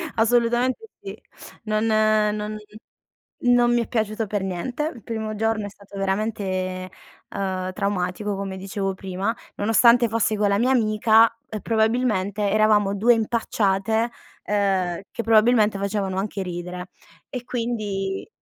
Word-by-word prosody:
assolutamente 240 - +1
sì. - - -6 0.5
Non 215 +1 0
non 215 -1 +1 0.9
non 245 0 +4
mi 240 - +3
è - - -5
piaciuto 220 -1 -1
per 205 -1 -2
niente. 245 - -3
Il 235 - -13
primo 220 -1 -4
giorno 225 -1 0
è - - -5
stato 200 0 -14
veramente, 190 -2 -2 0.5
uhm, 185 -1 -2
traumatico 200 +1 -2
come 195 -1 -4
dicevo 195 0 -3
prima, 190 +4 -3 0.2
nonostante 235 +3 +4
fossi 220 0 +1
con 205 0 +2
la 200 0 +2
mia 250 +3 +2
amica, 220 -1 +4 0.2
uhm, 215 -2 -4
probabilmente 220 -3 +1
eravamo 210 -1 +3
2 235 +4 +5
impacciate, 220 0 0 0.3
ehm, 190 -4 0
che 230 - -3
probabilmente 220 -2 +4
facevano 200 -1 -2
anche 200 0 -3
ridere. 180 0 -6 0.4
E 250 -2 -6
quindi 215 - -3
210 Hz, 130 wpm, -23 LUFS, 195-225 Hz, 0.9 s, 2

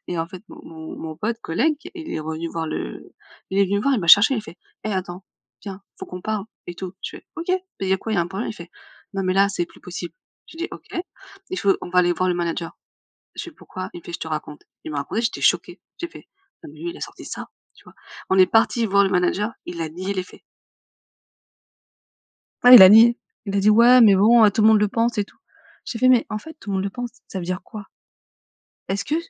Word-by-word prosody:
et 175 - -3
en 165 - -1
fait 185 +2 -11
mon - - -12
mon 160 -1 -9
mon 160 -1 -7
pote, 225 +7 -3
collègue, 275 - 0 0.2
il 325 -3 -8
est - - -2
revenu 160 +2 -4
voir 165 -1 -4
le - - -6 0.4
il 195 - -1
est 200 - +5
venu 200 +2 0
me 205 - -3
voir 275 -1 +2
et - - +1
il - - -3
m'a 170 - -4
cherché, 205 +8 +8
il 220 - -2
fait: 170 -4 -12 0.3
«Eh, 215 - -2
attends, 185 0 -5 0.4
viens, 195 -1 -8 0.2
faut - - -7
qu'on 180 0 -8
parle 215 -2 -2 0.2
et 175 - -6
tout» 185 0 -7
je - - -6
fais: - - -22
«OK, 330 - -6
beh, 370 - +3 0.2
il 190 - -2
y - - +2
a - - -3
quoi, 225 - -6
il - - +1
y - - +2
a - - +3
un - - -4
problème?» 195 +5 -4
il - - -7
fait: 170 -2 -11 0.4
«Non 195 - -1
mais 185 - +1
là, 200 +1 +4
c'est 175 -3 -2
plus - - -20
possible!» 175 -1 -7 0.4
j'ai 325 - -14
dit: 345 - -3
«OK, - - -10 0.6
il 370 - -3
faut 200 -2 +2
on - - -6
va 180 0 +4
aller 175 0 +2
voir 185 +1 0
le 180 - +1
manager.» 170 -1 -3 0.6
je - - -5
fais: 345 - -9
«Pourquoi?» 185 0 -8
il - - -7
me - - -29
fait: 175 - -8
«Je - - -6
te 160 - -5
raconte». 150 -1 -6 0.2
Il 155 - -6
m'a 145 - -2
raconté, 215 +11 -2
j'étais 230 - -2
choquée, 175 0 +1 0.2
j'ai 345 - -3
fait: - - -15 0.4
«Non, 315 - -9
mais - - -16
lui 345 +1 -4
il 345 - -10
a - - -13
sorti - - -8
ça?» - - -7 0.3
tu - - -20
vois? - - -17 0.4
On 190 - +3
est 185 - +7
parti 225 +3 +2
voir 200 0 +4
le 195 - 0
manager, 185 +4 +1 0.2
il 175 -1 -6
a 160 - -3
nié 185 +5 -5
les 185 - -1
faits. - - -17 2.2
Ouais, 245 +1 +9
il 230 - +12
a 185 - +11
nié, 230 +3 +7 0.3
il 200 - -3
a 200 - +3
dit: 205 +2 +4
«Ouais 240 +4 +7
mais 210 -4 +7
bon, 225 +4 +6
heu, - - +6
tout 215 - 0
le 215 - +6
monde 220 - +5
le 210 - +2
pense 230 +2 0
et 205 - +1
tout». - - -24 0.5
J'ai 230 - -5
fait: 255 - +4
«Mais 250 -2 +4
en 215 - -3
fait, 320 +8 -11
"tout 205 - -10
le 195 - -1
monde 190 - -1
le - - -1
pense", 245 +3 -6 0.2
ça 190 - -5
veut 175 - -6
dire 185 0 -3
quoi 210 -2 -10 1.0
est-ce 200 +1 -2
que 300 - -1
195 Hz, 275 wpm, -22 LUFS, 175-225 Hz, 2.2 s, il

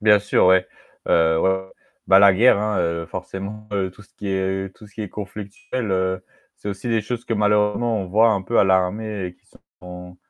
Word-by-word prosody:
Bien 105 -1 +5
sûr, 100 -2 +2
ouais. 95 0 +4 0.4
Heu 80 -1 +3
ouais, - - +3
ouais, 95 0 -2 0.4
bah 95 - +7
la 100 -1 +7
guerre 110 +2 +5
hein, 105 -1 -1
heu, 85 -1 -1
forcément 105 +2 -7 0.3
tout 105 - -16
ce - - -25
qui 100 - -6
est 95 0 -2
tout 105 - -15
ce 100 - -21
qui 110 - -5
est 105 - -5
conflictuel, 105 +3 -6
heu, 95 0 -1 0.3
c'est 105 - -8
aussi 100 +4 -5
des 115 -1 +1
choses 120 +3 -5
que 115 - -2
malheureusement 105 +2 +1
on 95 - -4
voit 110 +5 +4
un 100 -3 0
peu 115 +5 0
à - - +6
l'armée 95 +2 0
et 90 - -9
qui - - -37 0.4
sont 90 0 -10
100 Hz, 215 wpm, -22 LUFS, 95-105 Hz, 0.4 s, bah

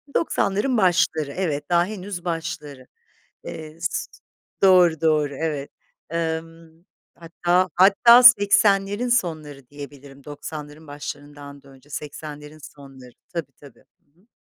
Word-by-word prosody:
90'ların 235 -3 0
başları, 170 -6 +1
evet, 150 -5 -3
daha 175 0 +3
henüz 190 -3 -7
başları. 155 -6 -5 0.6
Eee, 155 0 -9
s 165 - -3 0.5
Doğru, 180 -4 +5
doğru, 150 -3 +1
evet. 150 -2 -4 0.4
Imm, 165 0 -5 0.3
hatta, 175 +2 0
hatta, 205 +7 +6
80'lerin 205 -1 +5
sonları 155 - -2
diyebilirim, 140 -1 -12
90'ların 150 +1 -9
başlarından 145 -1 -9
da 140 - -19
önce 135 +2 -19
80'lerin 150 +1 -8
sonları. 135 -4 -14 0.2
Tabii, 165 -6 -6
tabii. 140 0 -18 0.2
Hı 150 +4 -35
hı. 200 - -31
160 Hz, 110 wpm, -22 LUFS, 145-180 Hz, 0.6 s, hatta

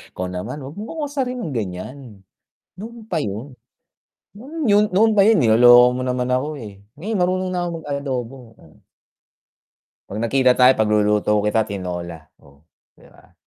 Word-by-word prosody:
Ikaw 90 0 -4
naman 105 +11 -6
wag 135 +6 -10
mo 210 - -6
akong 315 -2 -4
asarin 255 -3 -3
ng 160 - -5
ganyan, 100 +6 -5 0.8
noon 225 +3 -10
pa 180 - -4
yun. 115 +7 -6 0.8
Noon 285 +1 -4
'yon, 205 +1 +5
noon 215 +2 +3
pa 195 - +6
yun 220 -5 +4
niloloko 120 +2 +6
mo - - -3
naman 125 0 -2
ako, 140 +3 -2
eh. 105 -3 -10 0.2
Ngayon 200 +9 -4
marunong 185 +1 0
na 180 - -2
akong 170 - -4
mag - - -16
adobo, 130 -4 -5
oh. 80 - -20 1.3
'Pag 105 - -6
nagkita 125 +3 +3
tayo 125 +1 +7
pagluluto 105 -1 +1 0.2
kita 110 +1 +2
tinola. 90 -4 -6 0.2
Oh, 70 +1 -22 0.4
'di - - -19
ba? - - -22
130 Hz, 165 wpm, -20 LUFS, -, 1.3 s, tayo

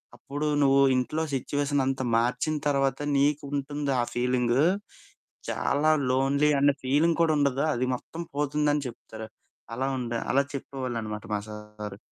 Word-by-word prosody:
అప్పుడు 145 +2 -4
నువ్వు 135 0 +5 0.2
ఇంట్లో 140 +5 -1
సిట్యుయేషన్ 145 +1 0
అంత 135 -1 -1 0.2
మార్చిన 125 +6 0
తర్వాత, 135 -1 +1 0.2
నీకు 145 +1 +2
ఉంటుంది 145 0 -2
ఆ - - +1
ఫీలింగ్. 125 0 +1 0.9
చాలా 155 +2 +2 0.2
లోన్లీ 140 +3 +2
అనే 140 0 +4
ఫీలింగ్ 155 +5 +2
కూడా 160 -2 +3
ఉండదు. 140 0 +1
అది 125 +1 -1
మొత్తం 165 +6 -8
పోతుందని" 145 -1 +1
చెప్తారు. 110 -1 -10 0.5
అలా 130 +2 -1
ఉండే 120 -1 -3
అలా 140 - +4
చెప్పేవాళ్ళు 130 -3 -4
అనమాట 105 -1 -6
మా - - +1
సారు. 105 -1 -8
135 Hz, 140 wpm, -27 LUFS, 125-145 Hz, 0.9 s, నువ్వు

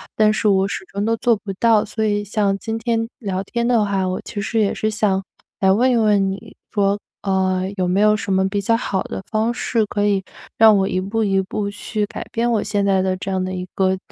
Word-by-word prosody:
但 215 -1 +4
是 215 - 0
我 195 -1 +3
始 - - -4
终 200 +2 -4
都 230 +1 +2
做 235 0 +3
不 195 -1 -6
到。 225 -3 +4
所 220 +1 -3
以 205 -1 +1
像 200 -1 0
今 225 +2 -4
天 225 0 -1
聊 195 -4 -3
天 235 +4 -2
的 230 -4 +3
话， 195 -2 0
我 185 - -2
其 205 - -5
实 225 +2 -1
也 205 - +2
是 215 - -1
想 200 -3 0 0.4
来 190 -1 +5
问 245 +6 +3
一 245 - +3
问 205 -3 +3
你， 210 +3 -9 0.2
说， 200 -1 +1 0.2
呃， 190 -1 0
有 180 -1 0
没 190 +3 +2
有 210 0 +5
什 195 - -2
么 190 0 +2
比 205 0 -1
较 230 +4 +2
好 195 -5 -2
的 190 - -6
方 220 +2 +1
式 230 -2 0
可 205 0 -1
以 200 -2 +1 0.3
让 220 -2 +7
我 195 0 +1
一 185 - -1
步 220 +3 -1
一 195 -1 +2
步 200 +2 -3
去 210 +1 -3
改 - - -7
变 235 +1 0
我 215 - +1
现 205 -1 0
在 190 -1 +3
的 185 0 0
这 195 +1 -5
样 185 -1 0
的 185 - -3
一 180 0 -4
个 190 -1 +2
205 Hz, 265 characters per minute, -20 LUFS, 190-220 Hz, 0.4 s, 让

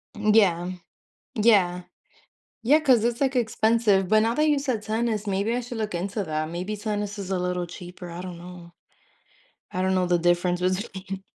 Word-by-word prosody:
M 210 0 +2
yeah, 180 -5 +3 0.6
yeah. 195 -6 +3 0.8
Yeah, 290 +7 +5
'cause 255 -7 +4
it's 235 +1 0
like 270 -1 +1
expensive, 220 -4 +2
but 215 +2 +5
now 230 +1 +1
that 305 +2 +2
you 295 - +3
said 255 -6 -2
tennis, 220 -1 -1
maybe 200 +4 0
I 245 - 0
should 240 -1 -7
look 215 -3 -3
into 195 +4 -2
that. 155 -1 -3
Maybe 185 +5 -4
tennis 205 -1 -3
is 195 -1 -6
a 190 - 0
little 180 0 -2
cheaper, 180 0 -10
I 170 +1 -7
don't 180 -2 -7
know. 175 -1 -11 1.0
I 185 - -3
don't 190 0 +1
know 185 -1 +2
the 175 -1 +2
difference 175 +1 +1
between 190 +1 -3
195 Hz, 185 wpm, -25 LUFS, 180-225 Hz, 1.0 s, Yeah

